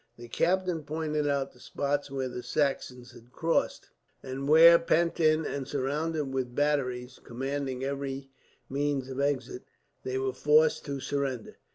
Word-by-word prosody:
The 120 0 -10
captain 180 +2 +1
pointed 150 0 -2
out 140 -1 0
the 125 - -21
spot 145 +2 -2
where 135 -1 -2
the 125 0 -6
Saxons 130 -3 -2
had 120 0 -16
crossed; 165 +4 -1 0.3
and 135 +1 -5
where, 165 +2 +8
pent 170 0 +1
in 155 -1 +3
and 140 -2 -4
surrounded 145 +1 -2
with 125 -2 -2
batteries 130 -4 -1
commanding 135 +1 -3
every 135 0 -4 0.4
means 140 -1 -1
of 130 0 -5
exit, 135 -3 -1 0.4
they 130 0 -3
were 130 0 -1
forced 150 +4 +3
to 140 -1 -4
surrender. 135 -4 -3
140 Hz, 150 wpm, -29 LUFS, 130-150 Hz, 0.4 s, where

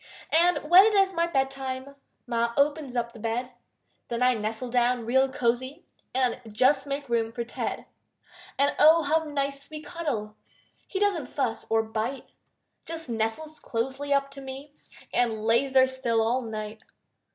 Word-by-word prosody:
And 345 +2 +4
when 360 +4 +9
it 435 - +1
is 390 -1 +4
my 335 -1 +1
bed 270 -4 0
time, 265 0 -5 0.3
Ma 235 0 0
opens 285 -2 +1
up 235 -1 -1
the 235 - -13
bed; 235 +3 -2 0.6
Then 235 +1 -1
I 250 0 +5
nestle 225 +2 -4
down 245 -1 +2
real 265 +3 +3
cozy 255 +2 -1 0.3
And 255 -2 +1
just 265 +5 +3
make 280 0 -3
room 230 -2 0
for 235 +1 -4
Ted 235 - -4 0.7
And 280 +1 +2
oh, 320 +2 +7
how 320 +2 +1
nice 280 -1 -3
we 310 -1 -7
cuddle! 285 -11 -4 0.5
He 385 - -3
doesn't 390 -10 +1
fuss 240 -5 -2
or 225 0 +3
bite, 220 +4 -4 0.6
Just 325 -4 -3
nestles 230 +8 -2
closely 265 +5 -3
up 275 0 +2
to 275 0 -6
me 270 +2 -8 0.4
And 225 -3 +1
lays 235 +5 +2
there 260 -1 +6
still 260 -3 -1
all 240 +3 +1
night. 215 -1 -6
260 Hz, 165 wpm, -27 LUFS, 235-285 Hz, 0.7 s, when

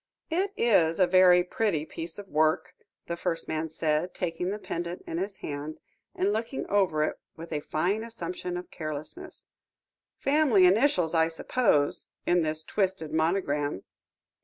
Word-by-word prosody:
"It 375 +4 +1
is 170 -8 +3
a 185 - +6
very 180 0 +6
pretty 180 -4 -1
piece 165 +1 -6
of 205 -1 -8
work," 155 -2 +1 0.3
the 170 - -3
first 170 -1 -3
man 160 +1 -2
said, 160 +2 -1
taking 180 0 -2
the 205 - -2
pendant 175 -3 -5
in 165 - -3
his 195 +1 -3
hand, 145 +1 -5 0.4
and 200 +2 +1
looking 230 +5 -3
over 185 -7 +2
it - - -2 0.2
with 165 0 -8
a 150 - 0
fine 180 +9 -1
assumption 180 -5 -5
of 180 - -8
carelessness; 155 - -7 0.7
"family 275 -10 +4
initials, 185 - +3
I 160 -1 +4
suppose, 165 - +1 0.2
in 175 0 +3
this 155 0 -1
twisted 190 -3 -1
monogram?" 155 - 0
175 Hz, 150 wpm, -28 LUFS, 160-195 Hz, 0.7 s, a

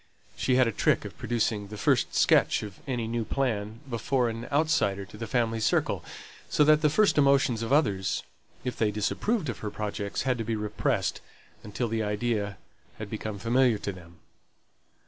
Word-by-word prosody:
She 130 - +1
had 130 0 +5
a - - 0
trick - - +1
of - - -8
producing 110 -3 -1
the 105 +1 -8
first - - +1
sketch - - +4
of 100 -3 -8
any 120 -4 -2
new 115 0 -1
plan 110 -3 -2
before 125 +1 0
an 115 +1 -6
outsider 140 -10 +1
to 100 - -14
the 115 +1 -6
family 115 0 0
circle; 105 -3 +1 0.5
so 150 - +4
that 155 +1 +5
the 150 - +4
first 200 +1 +3
emotions 135 -5 +3
of 115 - -3
others, 100 -11 +1 0.4
if 125 - -3
they 110 - +1
disapproved 155 - -1
of 120 - -4
her 105 - -4
projects, 100 -1 -3
had 125 -2 0
to - - -1
be 115 0 -2
repressed, 105 0 -1 0.4
until 105 +3 -3
the 110 0 -1
idea 105 -1 -1 0.4
had - - -7
become 110 -2 -4
familiar 120 +2 +3
to 100 - -4
them. 85 -2 -14
115 Hz, 180 wpm, -28 LUFS, 105-130 Hz, 0.5 s, had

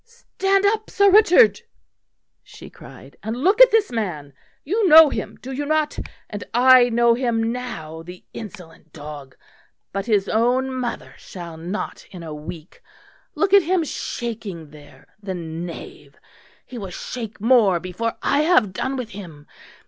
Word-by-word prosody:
"Stand 395 -4 -1
up, 435 +1 0
Sir 400 -1 +3
Richard," 430 +3 +5 0.8
she - - -14
cried, - - -15
"and 220 +2 -4
look 385 - +3
at - - +10
this 440 - +2
man. 170 - -4 0.3
You 405 +7 0
know 315 0 +9
him, - - -5
do 260 - -7
you 275 +2 -3
not? 305 0 -1 0.3
and 205 -1 -7
I 250 0 +6
know 235 0 +3
him 230 -2 -1
now, 170 -11 -6
the 180 +2 -12
insolent 175 -7 -11
dog! 145 -3 -10 0.6
But 195 +3 -4
his 205 -3 +1
own 250 +4 +1
mother 250 -2 -5
shall 170 -3 -9
not 175 +6 -6
in 180 -4 -10
a 160 -2 -7
week. 155 +2 -10 0.5
Look 400 -1 0
at 400 - +8
him 355 0 0
shaking 215 - -6
there, 145 -3 -16 0.2
the 190 -2 -5
knave; 165 0 -8 0.5
he 245 - -9
will 195 -3 -6
shake 225 +4 -7
more 215 -5 +4
before 185 +6 -4
I 280 - +2
have 295 - +3
done 260 +8 -3
with 250 -3 -5
him. 170 -8 -11
230 Hz, 155 wpm, -21 LUFS, 175-285 Hz, 0.8 s, at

